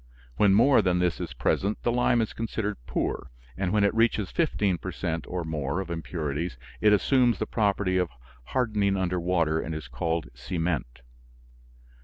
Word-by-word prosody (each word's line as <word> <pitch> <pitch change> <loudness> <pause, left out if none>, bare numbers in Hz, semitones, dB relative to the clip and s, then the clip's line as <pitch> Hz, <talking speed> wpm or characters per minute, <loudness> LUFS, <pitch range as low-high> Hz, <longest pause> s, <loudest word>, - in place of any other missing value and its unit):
When 100 -2 +5
more 125 +3 +6
than 90 -2 +2
this 90 -1 +1
is - - -5
present 100 +2 0
the 120 - +2
lime 120 0 +3
is 110 - -2
considered 110 -2 -3
poor, - - -2 0.3
and 95 -2 -1
when 105 0 +3
it 100 - +3
reaches 115 -4 +2
fifteen 105 - +1
per 95 - -5
cent. 85 -4 -3
or 90 -1 -3
more 80 0 -2
of 95 -2 -5
impurities 80 -2 -3 0.2
it 105 - +5
assumes 120 +3 +3
the 110 - -1
property 100 -4 +1
of 90 -2 +1 0.4
hardening 105 - +1
under 90 -1 0
water 85 -3 +1
and 80 0 -4
is 80 -4 -6
called 80 +6 -2
cement. 65 -2 -3
95 Hz, 170 wpm, -27 LUFS, 80-105 Hz, 0.4 s, more